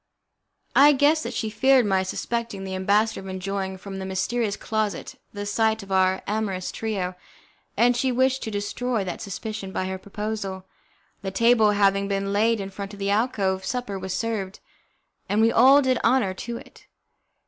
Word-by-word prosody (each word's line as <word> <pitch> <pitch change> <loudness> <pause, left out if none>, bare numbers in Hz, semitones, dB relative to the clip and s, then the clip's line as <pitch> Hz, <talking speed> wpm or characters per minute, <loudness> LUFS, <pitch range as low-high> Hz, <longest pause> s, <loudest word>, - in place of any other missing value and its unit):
I 290 +2 +8
guessed 290 +3 +3
that 240 -4 -5
she 220 -2 -2
feared 255 +3 +4
my 190 -2 +2
suspecting 220 +1 -3
the 190 0 -5
ambassador 205 +4 +1
of 195 - -10
enjoying 190 0 -4
from 195 +1 -8
the 190 - -5
mysterious 200 +3 -1
closet 215 -4 -2 0.2
the 205 0 -5
sight 220 +1 +1
of 195 - -12
our 190 0 +2
amorous 200 -3 -2
trio, 195 -5 -3 0.6
and 240 +3 +4
she 260 +2 +1
wished 260 +1 +2
to - - -4
destroy 215 +2 -2
that 180 -2 -5
suspicion 210 -1 -5
by 185 - -2
her 190 0 -4
proposal. 200 -2 -5 0.6
The 195 - -3
table 225 +2 +4
having 200 -1 +2
been 195 0 -1
laid 225 +2 +2
in 195 0 -5
front 200 +1 -7
of 200 - -10
the 200 0 0
alcove, 200 -4 0
supper 205 -2 -3
was 190 0 -4
served, 210 -4 -3 0.7
and 205 +2 +1
we 225 +1 +5
all 270 +5 +6
did 255 -2 +2
honour 230 -6 +3
to 235 +5 -6
it. - - -15
205 Hz, 175 wpm, -24 LUFS, 195-230 Hz, 0.7 s, I